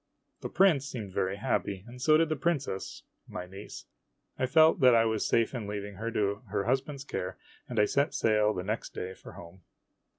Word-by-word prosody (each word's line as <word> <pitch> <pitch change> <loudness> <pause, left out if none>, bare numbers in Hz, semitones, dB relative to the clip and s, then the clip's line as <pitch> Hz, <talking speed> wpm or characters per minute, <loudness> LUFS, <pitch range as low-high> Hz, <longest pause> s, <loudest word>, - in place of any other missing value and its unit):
The - - -5
prince 165 -7 +3
seemed 110 -9 -6
very 95 +1 0
happy, 100 -3 -2
and 125 +1 -11
so 155 +3 +5
did 165 0 +2
the 155 - 0
princess 140 - -2 0.2
my 90 - -6
niece. 95 +2 -10 0.5
I 130 - -1
felt 160 +4 +5
that 125 -2 +6
I 115 0 +4
was 110 -1 0
safe 115 +1 +2
in 115 -5 -4
leaving 100 -1 -5
her 115 +3 -3
to 100 -3 -1
her 100 0 -1
husband's 135 +4 -1
care, 90 -9 -5 0.3
and 120 - -1
I 105 - +6
set 140 +7 0
sail 105 -1 +3
the 90 -4 -4
next 110 +4 -4
day 95 +1 -4
for - - -13
home. 85 +2 -12
115 Hz, 200 wpm, -29 LUFS, 100-135 Hz, 0.5 s, that